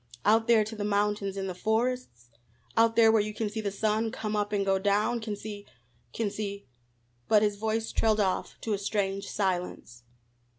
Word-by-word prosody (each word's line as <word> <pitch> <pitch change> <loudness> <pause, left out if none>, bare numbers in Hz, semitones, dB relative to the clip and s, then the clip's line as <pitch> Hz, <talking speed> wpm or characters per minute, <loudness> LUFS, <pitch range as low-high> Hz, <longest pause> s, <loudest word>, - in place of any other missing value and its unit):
Out 225 +2 +4
there 230 -2 +5
to 220 +1 -7
the 210 - -4
mountains 205 -1 0
and 195 0 -2
the 185 - -3
forests? 220 - -2 0.4
Out 225 0 +4
there 225 -1 +6
where 220 -1 +4
you 210 0 -4
can 215 -1 -2
see 220 +1 -3
the 205 - -1
sun 215 +2 0
come 215 -1 -3
up 205 0 -1
and 200 -1 0
go 195 0 +2
down, 205 +4 +1
can 220 -2 -4
see 205 0 -8 0.4
can 210 - -2
see 200 -1 -5 0.3
" 120 0 -41
but 210 -1 +5
his 205 -1 +1
voice 220 +1 -1
trailed 220 -1 +2
off 190 -3 -1
to 220 - -1
a 200 - -1
strange 195 -1 -2
silence. 180 - -2
210 Hz, 200 wpm, -28 LUFS, 200-220 Hz, 0.4 s, there